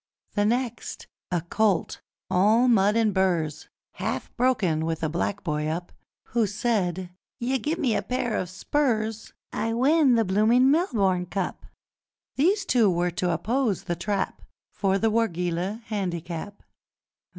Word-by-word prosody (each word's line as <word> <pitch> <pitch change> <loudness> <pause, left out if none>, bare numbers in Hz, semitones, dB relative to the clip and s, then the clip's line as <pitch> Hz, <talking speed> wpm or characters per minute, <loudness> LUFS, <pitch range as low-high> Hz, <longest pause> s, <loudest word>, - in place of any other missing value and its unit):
The 205 -1 +1
next, 240 +1 -2 0.2
a 175 -2 0
colt 200 +1 0 0.3
all 215 +7 +4
mud 210 -3 +4
and 225 -3 +2
burrs! 175 -6 0 0.2
Half - - -4
broken, 210 -11 +1
with 165 0 -2
a 160 - +1
black 185 +5 -2
boy 150 -3 -1
up, 170 +3 -3 0.4
Who 230 -2 +1
said, 190 -4 -1 0.3
'You 260 +2 0
gim'me 295 -3 0
pair 245 -3 -2
o' - - -1
spurs, 220 - -1 0.2
I 225 0 -1
win 270 +2 +4
the 225 -1 +2
bloomin' 225 +7 +4
Melbourne 200 - +1
Cup!' 195 0 -4 0.7
These 385 +8 +2
two 235 - +4
were 175 0 +1
to 180 +1 -1
oppose 220 - 0
The 175 - -2
Trap 195 +2 -2 0.3
For 195 -1 +1
the 220 +2 +1
Wargeilah 185 -1 -1
Handicap! 185 -2 -4
205 Hz, 135 wpm, -26 LUFS, 180-235 Hz, 0.7 s, all